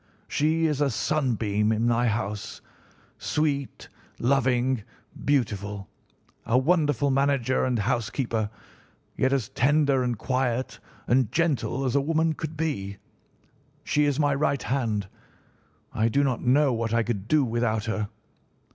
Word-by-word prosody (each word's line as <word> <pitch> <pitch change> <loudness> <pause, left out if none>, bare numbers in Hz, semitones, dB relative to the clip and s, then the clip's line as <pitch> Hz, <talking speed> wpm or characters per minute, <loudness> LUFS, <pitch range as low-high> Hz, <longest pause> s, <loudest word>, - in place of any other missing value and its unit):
She 160 +2 +1
is 150 -2 0
a 145 - +3
sunbeam 110 -6 0
in 110 +1 +1
my 120 +1 +2
house—sweet, 120 +6 -4 0.3
loving, 130 -1 +1 0.4
beautiful, 105 -7 -1 0.5
a 120 - +2
wonderful 145 -2 +2
manager 135 -2 +1
and 125 -2 0
housekeeper, 115 0 -1 0.7
yet 130 - +1
as 130 -5 0
tender 140 +1 +2
and 120 -2 -1
quiet 130 +1 -1 0.3
and 125 -3 +2
gentle 145 -5 0
as 130 0 0
a 140 - +4
woman 160 +2 +1
could 155 0 -6
be. 100 -12 -2 0.9
She 150 0 +2
is 145 0 0
my 145 -1 +3
right 140 -2 0
hand. 110 -7 -1 0.9
I 110 +1 +2
do 140 +5 +2
not 130 -4 0
know 135 +2 +3
what 115 0 -1
I 115 - +3
could 110 -4 -3
do 150 +1 +3
without 115 -2 0
her. 110 -2 -2
130 Hz, 130 wpm, -26 LUFS, 115-145 Hz, 0.9 s, a